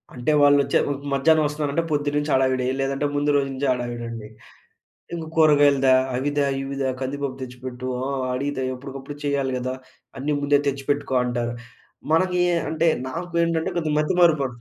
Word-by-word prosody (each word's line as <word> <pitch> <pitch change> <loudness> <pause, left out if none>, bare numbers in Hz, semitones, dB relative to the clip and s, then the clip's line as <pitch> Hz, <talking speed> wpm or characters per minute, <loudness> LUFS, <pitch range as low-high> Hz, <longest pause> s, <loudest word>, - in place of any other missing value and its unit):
అంటే 125 +5 0
వాళ్ళచ్చె 145 -1 +4 0.3
మధ్యాహ్నం 155 +3 +4
వస్తున్నారంటే 150 +1 -1
పొద్దున్న 145 -1 0
నుంచి 145 0 -3
హడావిడి! 130 -1 +2
లేదంటే 135 +1 -1
ముందు 145 +1 +1
రోజు 140 -1 +2
నుంచే 135 +1 -2
హడావిడండి. 120 -3 -4 0.9
ఇంక 165 -1 -5
కూరగాయలు 145 -3 +5
దే 130 - +6 0.2
అవి 135 +3 -1
దే 145 - +3 0.2
ఇవి 135 0 -5 0.3
కందిపప్పు 135 0 -3
తెచ్చిపెట్టు 125 0 -7 0.2
ఆ - - -2 0.3
అడిగితే 140 0 -2
ఎప్పటికప్పుడు 135 +2 -8
చెయ్యాలి 140 -2 0
గదా! 130 +1 -3 0.5
అన్నీ 150 +2 -1
ముందే 145 0 +3
తెచ్చిపెట్టుకో 140 0 -2
అంటారు. 120 -1 -2 0.6
మనకి 180 +2 +2
ఎ - - +2
అంటే 160 +1 +1 0.2
నాకు 170 +6 -5
ఏంటంటే 165 -1 0
కొంచెం 155 -3 -1
మతిమరుపు. 155 -2 +3
140 Hz, 150 wpm, -23 LUFS, 130-150 Hz, 0.9 s, దే